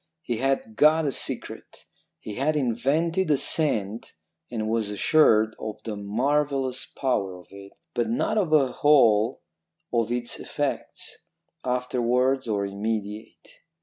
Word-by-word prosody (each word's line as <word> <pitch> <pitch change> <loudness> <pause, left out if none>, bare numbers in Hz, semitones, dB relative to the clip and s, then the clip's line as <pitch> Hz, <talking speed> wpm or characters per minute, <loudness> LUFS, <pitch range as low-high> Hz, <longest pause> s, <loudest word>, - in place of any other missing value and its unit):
He 120 -5 -2
had 135 -3 -1
got 155 +4 +4
a 140 - +1
secret. - - -5 0.3
He 105 - -7
had 145 +7 0
invented 150 +8 0
a 145 - +4
scent 115 -9 0 0.3
and 110 -3 -3
was 110 -2 0
assured 110 0 +3
of 110 - -5
the 110 -2 -4
marvellous 130 +5 -1
power 100 -9 -2
of 90 - -16
it, 100 0 -12 0.2
but 120 -1 0
not 215 - 0
of 185 -6 0
the 145 -5 +3
whole 115 -7 +3 0.5
of 115 -1 +1
its 120 -1 -3
effects, - - -4 0.4
afterwards 125 +1 0
or 100 -2 0
immediate. 105 +1 -5
120 Hz, 130 wpm, -25 LUFS, 110-140 Hz, 0.5 s, got